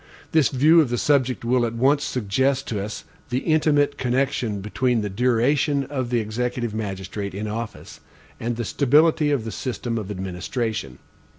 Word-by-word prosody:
This 155 -5 +4
view 155 +6 +5
of 145 - 0
the 120 - -1
subject 130 -3 +1
will 125 +1 +2
at 115 -1 -2
once 140 +5 +3
suggest 130 +4 0
to 105 -3 -2
us 105 - -6 0.3
the 125 - 0
intimate 150 -3 +2
connection 125 -4 0
between 115 +4 0
the 105 -1 -3
duration 130 +6 +2
of 130 -3 -3
the 120 -1 +1
executive 120 +1 -2
magistrate 100 -2 -4
in 105 +2 -3
office 110 +1 -6 0.4
and 120 +1 -2
the 120 0 -3
stability 150 +5 +3
of 140 -6 0
the 110 - -4
system 120 -1 -3
of 105 -2 -6
administration. 95 - -4
120 Hz, 165 wpm, -23 LUFS, 110-140 Hz, 0.4 s, view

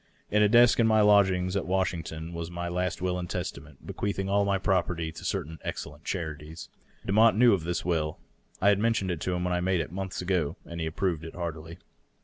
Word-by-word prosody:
In 105 - +3
a 105 - +5
desk 120 +2 +6
in 115 - +5
my 110 -1 +4
lodgings 95 -3 +4
at 100 - -1
Wash 95 +1 +1
ington 80 0 -6
was 85 0 -5
my 85 0 -4
last 90 +1 -2
will 90 -1 0
and 90 -1 -5
testament, 70 -1 -6
bequeathing 95 -1 -3
all 100 +1 +2
my 100 -1 +2
property 90 -4 0
to - - -11
certain 80 +2 -3
excellent 75 +1 -6
charities. 80 -2 -5 0.4
Demotte 110 +3 +4
knew 120 -1 +6
of 90 -5 -1
this 85 -1 -2
will; 80 -3 -1 0.4
I 100 - +4
had 100 -1 +3
men 115 +2 +3
tioned 95 -5 -1
it 85 -2 -4
to 90 - -1
him 90 - -2
when 90 0 0
I 90 - +1
made 90 0 +1
it, 80 - -3
monlhs 95 0 -4
ago, 90 -5 -1
and 85 0 -7
he - - -1
had 80 - -5
approved 85 -5 -1
it 80 - -8
heartily. 85 -1 -6
90 Hz, 230 wpm, -28 LUFS, 80-100 Hz, 0.4 s, desk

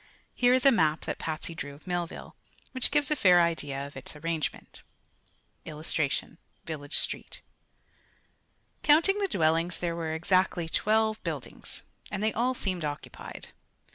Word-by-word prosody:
Here 245 +1 +4
is 255 - +1
a 275 - +9
map 160 -9 +3
that - - -4
Patsy 160 +1 -3
drew 145 -3 -6
of 150 - -19
Millville, 175 -2 -4 0.4
which 260 -2 0
gives 295 0 +1
a - - +4
fair 180 -9 +6
idea 145 -5 0
of 140 - -11
its 130 +3 -9
arrangement: 160 +1 -4 0.8
[Illustration: 155 0 -2 0.3
Village 145 -3 -2
Street] - - -2 1.4
Counting 330 +7 +5
the 400 - +1
dwellings 165 - +1
there 170 -1 -2
were 160 -1 -2
exactly 180 0 +2
twelve 220 +5 +2
buildings, - - -5 0.3
and 205 0 -3
they 220 - +2
all 250 +3 +1
seemed 185 -7 -1
occupied. 145 -1 -6
170 Hz, 140 wpm, -29 LUFS, 155-220 Hz, 1.4 s, a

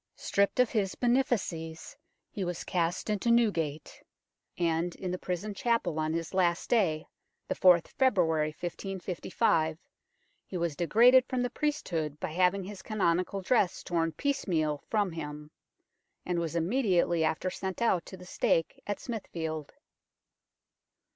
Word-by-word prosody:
Stripped 200 +4 0
of 250 -3 +4
his 200 -4 0
benefices, 205 -10 -1 0.4
he 200 - -3
was 175 -1 -3
cast 175 -1 -1
into 210 +2 0
Newgate; 170 -11 +1 0.6
and 170 0 0
in 185 -2 -4
the 180 - -3
prison 185 +4 -3
chapel 200 -7 0
on 155 0 0
his 165 +2 -3
last 175 -2 +1
day, 175 -10 +2 0.4
the - - 0
4th 180 -2 +5
February 170 - +2
1555, 175 -1 -1 0.7
he 185 - -4
was 170 -3 -1
degraded 240 - +6
from 255 -1 -1
the 245 - -2
priesthood 170 - -2
by - - -3
having 185 +3 +2
his 195 +1 -8
canonical 190 -2 0
dress 200 -3 +1
torn 165 -1 0
piece 280 - -1
meal 155 -5 0
from 205 -4 +1
him, 150 -2 -7 0.7
and 175 -1 0
was 165 -1 -3
immediately 175 -3 +2
after 160 +3 0
sent 190 0 -4
out 210 -7 +2
to 190 - -9
the 180 - -12
stake 165 -2 0
at 205 - -2
Smithfield. 160 - -5
180 Hz, 140 wpm, -30 LUFS, 165-210 Hz, 0.7 s, degraded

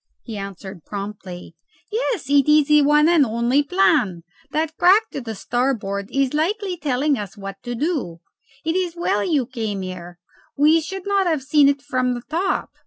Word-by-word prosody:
He 225 - -7
answered 195 -3 -8
promptly, 195 -4 -7 0.4
"Yes; 445 - -2
it 280 0 +3
is 300 -1 +4
the 300 0 +6
one 295 +2 +4
and 335 -3 +5
only 235 +3 +1
plan. 285 - +2 0.3
That 310 +2 -2
crack 400 +7 +4
to 240 -5 -5
starboard 210 -4 -2
is 275 0 0
like 335 +8 0 0.2
telling 280 -1 +1
us 205 0 -7
what 195 -1 -8
to 240 -1 -5
do. 255 - -2 0.5
It 325 +1 0
is 360 -2 -1
well 275 -12 0
you 280 0 +1
came 220 -6 -4
here. 175 -1 -8 0.4
We 310 +3 +5
should 380 +4 -7
not 400 -2 +1
have 315 -5 0
seen 285 0 +4
it 280 -1 -1
from 255 -3 0
the 240 - -6
top. 350 +7 -2
275 Hz, 175 wpm, -21 LUFS, 205-315 Hz, 0.5 s, the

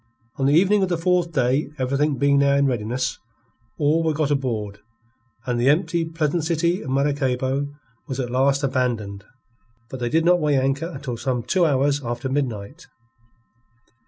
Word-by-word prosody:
On 135 - +1
the 145 - +4
evening 195 +4 +4
of 190 - +1
the 175 - 0
fourth 175 0 +1
day, 135 0 +1
everything 140 +2 0
being 140 +2 +3
now 140 0 +3
in 140 0 +3
readiness, 125 +1 -2 0.6
all 155 +2 +2
were 160 -2 0
got 150 -1 0
aboard, 110 -8 -2 0.7
and 120 -1 -1
the 130 - +4
empty, 165 +2 +1
pleasant 160 0 -1
city 170 +2 0
of 140 - -7
Maracaybo 135 0 0 0.4
was 130 0 -4
at 125 -2 -3
last 135 +3 +2
abandoned. 115 -7 -2 0.7
But 130 - -6
they 120 -1 -1
did 160 +5 +2
not 175 0 +5
weigh 150 -3 +2
anchor 135 +4 0
until 135 -7 -6
some 125 0 -2
two 170 +8 +2
hours 140 0 +1
after 120 +2 -3
midnight. 130 - -3
140 Hz, 165 wpm, -22 LUFS, 125-155 Hz, 0.7 s, not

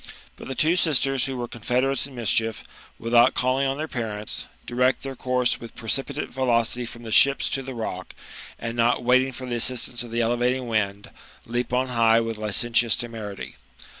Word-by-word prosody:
But - - -10
the 135 - -4
two 160 +6 +3
sisters 135 -6 +2
who 135 -1 -4
were 120 -1 -3
confederates 125 +4 0
in 135 - -13
mischief, 115 -1 0 0.3
without 120 +2 +4
calling 130 +2 +1
on 135 +1 -1
their 155 +1 -3
parents, 110 -6 -4 0.2
direct 125 +1 +1
their 135 -1 -5
course 125 -1 0
with 115 - -10
precipitate 115 +4 -2
velocity 120 -2 0
from 120 +1 -10
the 110 - -7
ships 140 +5 +5
to 135 - 0
the 130 -1 -7
rock, 95 -5 -5 0.4
and 115 0 -5
not 120 +1 +2
waiting 130 +2 +4
for 130 +1 -7
the 125 - -4
assistance 120 0 0
of 120 - -5
the 115 +1 -1
elevating 120 +2 0
wind, 100 -3 -1 0.3
leap 120 +1 -2
on 130 +1 +1
high 115 -2 +4
with 115 -1 -3
licentious 115 +2 +2
temerity. 110 -4 -6
120 Hz, 180 wpm, -24 LUFS, 115-130 Hz, 0.4 s, ships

